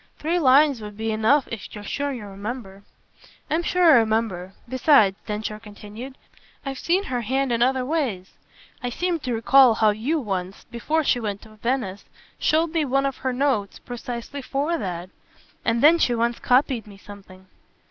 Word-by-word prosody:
Three 335 +4 0
lines 280 -3 +4
would 210 -1 -9
be 220 0 -2
enough 220 +6 +2
if 225 -3 -7
you're 210 - -8
sure 285 +7 -2
you 240 -6 -6
remember." 200 0 -7 0.7
"I'm 320 +2 +2
sure 360 +1 0
I 320 -6 +8
remember. 220 -5 0
Besides," 255 -6 +4
Densher 215 0 -4
continued, 215 +4 -10 0.5
"I've 270 -1 -4
seen 365 +4 +1
her 250 -9 -3
hand 265 +3 -1
in 235 0 0
other 255 +1 +2
ways. 255 - -2 0.5
I 245 - -2
seem 345 +6 -1
to 255 -3 -4
recall 250 +1 +5
how 215 -1 +4
you 250 +10 -1
once, 190 -6 -4
before 305 +7 -1
she 250 - +2
went 205 -3 -4
to 220 - -14
Venice, 220 -4 -2 0.3
showed 320 +1 +2
me 325 -2 +1
one 275 0 +1
of 275 -2 -2
her 260 - -2
notes 250 -7 0
precisely 245 +3 -7
FOR 285 +5 -1
that. 180 -1 -5 0.5
And 230 +2 0
then 330 +3 +7
she 245 - +2
once 235 +1 0
copied 250 -3 +2
me 200 -1 -13
something." 195 -2 -14
240 Hz, 175 wpm, -23 LUFS, 210-275 Hz, 0.7 s, I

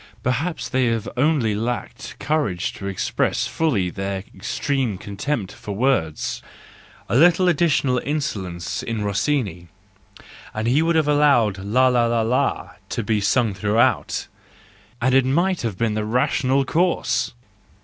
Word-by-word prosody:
Perhaps 140 +8 -1
they 130 -1 +1
have 115 -1 -1
only 130 -5 +2
lacked 115 +1 -4
courage 145 - -1
to 100 - -7
express 95 -2 -1
fully 110 - 0
their 95 0 -4
extreme 125 -3 -2
contempt 100 +3 -3
for 105 - -7
words: 105 - 0 0.7
a 100 - -1
little 175 +5 +5
additional 145 -6 +2
insolence 110 - -3
in 115 -4 -3
Rossini, 100 - -1 0.9
and 110 +1 -2
he 135 +6 +3
would 165 +1 +1
have 155 -2 +2
allowed 140 -9 +3
la 115 +7 +2
la 120 -2 +3
la 115 -1 +1
la 120 +3 0 0.2
to 115 - -2
be 105 -1 0
sung 110 +2 +2
throughout—and 115 +4 -2
it 135 0 +5
might 170 +8 +1
have 110 -6 -3
been 115 0 0
the 105 0 -1
rational 130 +3 +1
course 170 +5 0
120 Hz, 135 wpm, -22 LUFS, 105-145 Hz, 0.9 s, little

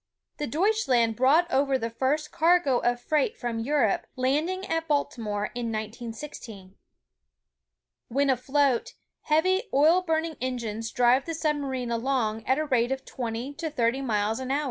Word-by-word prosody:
The 295 - -3
Deutschland 270 - +2
brought 275 +8 +4
over 270 0 +2
the 230 -2 -4
first 295 +5 -1
cargo 330 -6 +3
of 240 0 0
freight 305 - 0
from 235 -2 -3
Europe, 240 -3 +1
landing 305 +9 0
at 325 0 -2
Baltimore 225 -8 -1
in 240 -1 -3
1916. 220 -2 -7 1.3
When 275 +3 +2
afloat, 265 0 +1 0.3
heavy 375 +8 +2
oil 315 +6 +5
burning 320 -3 -1
engines 230 -3 -3
drive 250 +3 +3
the 330 - -3
sub 305 -2 0
marine 260 -4 -3
along 230 -2 -1
at 260 +2 +3
a 310 - 0
rate 250 -3 +1
of 265 0 -3
twenty 240 +2 -4
to 320 +2 -4
thirty 250 -2 0
miles 220 -3 0
an 260 -1 -5
hour. 275 +2 +1
265 Hz, 150 wpm, -26 LUFS, 235-300 Hz, 1.3 s, oil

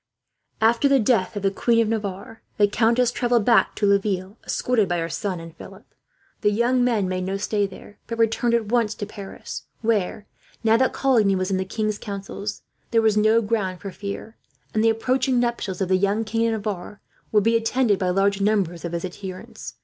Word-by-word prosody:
After 230 +5 +4
the 275 -1 +5
death 220 -3 +1
of 205 - -4
the 195 - +2
Queen 230 +3 +2
of 230 - +3
Navarre 210 0 -4 0.2
the 205 - +5
countess 230 +3 +2
travelled 240 -3 +1
back 230 -5 +4
to 210 - 0
Laville, 200 -1 +1
escorted 225 -7 0
by 175 - 0
her 165 0 -2
son 185 +4 -3
and 165 0 -10
Philip. - - -12 0.6
The 210 - +3
young 240 +4 +2
men 225 -6 +1
made 185 0 -2
no 190 +1 -2
stay 205 0 0
there, 195 +2 -14
but 230 - -4
returned 230 +1 +2
at 230 -2 0
once 230 -3 +1
to 205 - -4
Paris 200 -1 -8 0.2
where, 215 -2 0 0.4
now 225 0 +4
that 260 +2 +2
Coligny 225 -8 +3
was 185 +1 -1
in 190 - +1
the 190 - -2
king's 215 +1 -2
counsels, 200 +1 -6 0.3
there 230 - +3
was 220 -1 +3
no 215 +2 +4
ground 205 -4 -1
for 195 - -6
fear, 205 +3 -7 0.4
and 215 - +1
the 225 - +5
approaching 250 +3 +1
nuptials 235 -6 -2
of 190 - +1
the 185 - +4
young 200 +3 +1
King 225 +1 0
of 225 - 0
Navarre 205 -2 -4 0.3
would 210 -2 +4
be 230 +2 +3
attended 225 -2 +2
by 185 -2 0
large 195 +2 +1
numbers 195 -5 0
of 170 -1 -4
his 170 +1 -2
adherents. 185 0 -8
210 Hz, 205 wpm, -23 LUFS, 195-230 Hz, 0.6 s, the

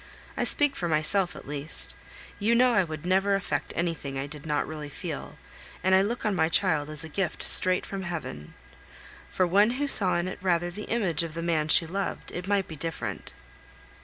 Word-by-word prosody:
I - - 0
speak 290 -1 +3
for 175 - -2
myself 170 +4 +3
at - - -11
least; 145 +2 -3 0.5
you 220 +3 +2
know 250 +1 +4
I 195 -4 +4
would 155 -2 -7
never 190 +2 +2
affect 195 - -2
anything 165 -5 -3
I 135 - -2
did 150 +1 -10
not 150 -1 0
really 150 -2 -6
feel, - - -7 0.5
and 190 - +3
I 190 - +6
look 230 +4 -2
on 210 - +1
my 160 -3 +2
child 160 -4 +2
as 155 +1 0
a - - -6
gift 175 +2 -3
straight 185 0 +3
from 195 -1 -5
Heaven. 160 - -6 0.7
For 185 - +1
one 200 +5 +4
who 290 +1 -1
saw 195 -9 +5
in 175 +1 -1
it 185 - -6
rather 175 -2 +1
the 210 +4 -8
image 190 -9 +1
of 165 -1 -5
the 165 - -4
man 160 -3 0
she 165 - +6
loved, 195 +4 -4
it 180 +1 -6
might 200 -2 +1
be 160 - -8
different. 165 +2 -5
175 Hz, 205 wpm, -27 LUFS, 155-195 Hz, 0.7 s, I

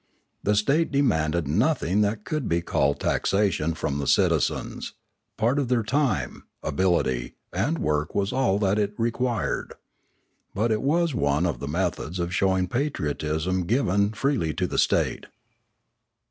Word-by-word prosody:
The 105 - +1
state 140 +11 +2
demanded 85 - +1
nothing 105 - +1
that 105 +1 -1
could 155 -6 -2
be 85 0 +1
called 70 -4 +1
taxation 95 -5 +1
from 75 -3 -2
the 70 - -3
citizens; - - +1 0.4
part 120 +6 +2
of 140 - 0
their 120 -2 +1
time, 115 - -1 0.2
ability, 70 -7 0 0.2
and 115 - 0
work 75 - -1
was 100 +3 0
all 125 -7 +2
that 100 0 +1
it 105 0 -1
required. 120 +1 -1 0.8
But 110 +4 +1
it 110 - +1
was 165 +3 +1
one 75 - +1
of 85 - -1
the 70 - -5
methods 85 +1 -2
of 85 0 -2
showing 95 -1 +2
patriotism 85 - -1
to 90 - -3
give 100 -2 +1
freely 120 - 0
to - - 0
the - - -1
state. - - +1
100 Hz, 145 wpm, -25 LUFS, 80-120 Hz, 0.8 s, state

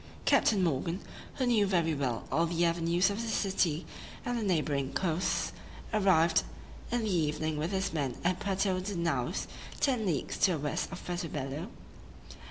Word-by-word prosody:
Captain 200 -4 +4
Morgan, 165 +3 0 0.4
who 260 - 0
knew 225 -5 +3
very 170 -4 +2
well 130 -6 -1
all 165 +1 +3
the 170 +1 +1
avenues 170 +3 +2
of 205 +3 -3
this 225 -2 -1
city 185 -5 +1 0.4
and 245 - -1
the 235 - -1
neighboring 150 -8 0
coasts, 175 -1 0 0.4
arrived 170 -5 +4 0.5
in 240 -1 +1
the 205 -4 +1
evening 155 -1 0
with 155 +3 -1
his 190 -2 -1
men 140 -6 -1
at 180 +1 +1
Puerto 195 -1 0
de 195 +2 -4
Naos, 170 -1 0 0.3
ten 250 -7 +1
leagues 150 -7 -1
to 185 - +4
the - - -1
west 145 +4 -2
of 190 - -8
Puerto 175 -1 -2
Bello. 145 +5 -4
175 Hz, 170 wpm, -31 LUFS, 155-195 Hz, 0.5 s, Captain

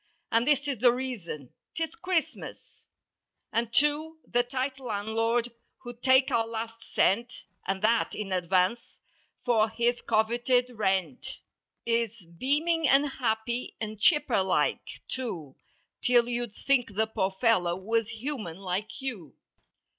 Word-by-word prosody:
And 230 +2 +3
this 290 -1 +3
is 275 -6 -2
the 245 +1 +6
reason: 225 - -5 0.2
'Tis 325 -1 -2
Christmas. 365 -6 -2 1.0
And 230 0 0
too, 295 +5 +1
the 245 - +3
tight 260 +2 -3
landlord 225 +1 -1 0.3
who'd 240 -1 -9
take 260 0 +5
our 225 -1 +2
last 225 0 -5 0.2
cent 235 +6 +2 0.2
(And 195 +1 -1
that 230 +1 +2
in 205 -2 -4
advance) 185 +4 +2 0.7
for 225 -3 +3
his 235 +2 0
coveted 240 +3 +2
rent. 190 - -1 0.4
Is 230 -1 0 0.2
beaming 310 - +2
and 275 +2 +5
happy 235 +1 -1
and 215 -1 -5
chipper 290 - +3
like, 190 0 +1 0.3
too, 175 - -5 0.5
'Till 240 -1 +4
you'd 240 -3 -3
think 245 -7 +1
the 220 +2 +3
poor 205 -3 -1
fellow 185 -8 +3
was 225 +4 -1
human— 225 - -5
like 195 +6 -4
you. 195 - -5
235 Hz, 130 wpm, -28 LUFS, 210-255 Hz, 1.0 s, the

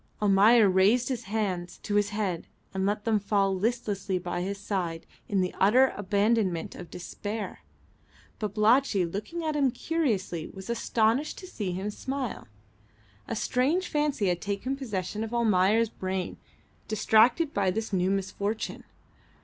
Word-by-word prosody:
Almayer 210 +2 +6
raised 200 +7 +3
his 245 -3 -3
hands 190 -4 -2
to 205 - -3
his 205 0 +3
head 205 -5 -2 0.3
and 190 0 0
let 210 +1 -1
them 220 -2 +3
fall 200 -1 +1
listlessly 205 -2 -1
by 175 0 -3
his 195 +2 -3
side 180 -5 -3 0.2
in 195 -2 +2
the 180 - -1
utter 250 +7 +5
abandonment 205 -3 +1
of 175 - -9
despair. 205 +4 -5 0.8
Babalatchi, 215 0 +3
looking 210 - -5
at 310 -1 -1
him 280 -3 +3
curiously, 225 - -1
was 190 +4 -7
astonished 235 +4 +1
to 375 - -9
see 210 - -4
him 195 +3 -3
smile. 265 +3 -4 0.8
A - - -3
strange 270 - +1
fancy 295 -7 0
had 175 -1 -1
taken 205 +7 -2
possession 215 -5 -3
of 225 +1 -4
Almayer's 220 0 +3
brain, 185 -3 -4 0.5
distracted 235 +8 +3
by 195 -2 +2
this 220 +3 -3
new 185 0 +2
misfortune. 200 +2 -2
210 Hz, 140 wpm, -28 LUFS, 190-235 Hz, 0.8 s, Almayer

